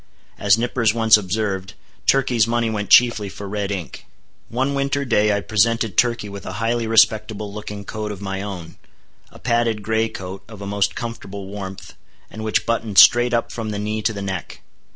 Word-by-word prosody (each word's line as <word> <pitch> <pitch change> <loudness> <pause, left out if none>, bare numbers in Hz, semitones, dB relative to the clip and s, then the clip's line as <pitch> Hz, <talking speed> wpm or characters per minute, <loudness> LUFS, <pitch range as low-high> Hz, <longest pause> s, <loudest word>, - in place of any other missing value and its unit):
As 100 +1 +4
Nippers 115 -1 +1
once 110 -1 +6
observed, 100 -1 -2 0.3
Turkey's 125 -4 +3
money 115 -1 0
went 105 -2 -3
chiefly 120 -4 +5
for 100 +1 -8
red 100 0 -3
ink. 90 -7 -6 0.4
One 130 +4 -1
winter 140 0 -1
day 105 -4 +2
I 100 0 0
presented 115 +2 +1
Turkey 120 -3 +1
with 100 -1 -8
a - - -6
highly 115 +1 -1
respectable 110 -2 +2
looking 105 -1 -7
coat 105 0 -5
of 100 - -7
my 95 -1 -4
own, 90 -5 -7 0.5
a - - -14
padded 115 -3 0
gray 110 +1 0
coat, 95 -1 -8
of 110 -2 -11
a 100 - -7
most 100 0 0
comfortable 100 -5 -6
warmth, 95 -2 -8 0.4
and 110 - -7
which 110 - 0
buttoned 115 -3 -2
straight 120 0 +7
up 120 -1 0
from 115 -2 -5
the 105 - -3
knee 105 +1 -2
to 110 - +1
the 100 -2 -6
neck. 95 -4 -5
110 Hz, 185 wpm, -21 LUFS, 100-115 Hz, 0.5 s, straight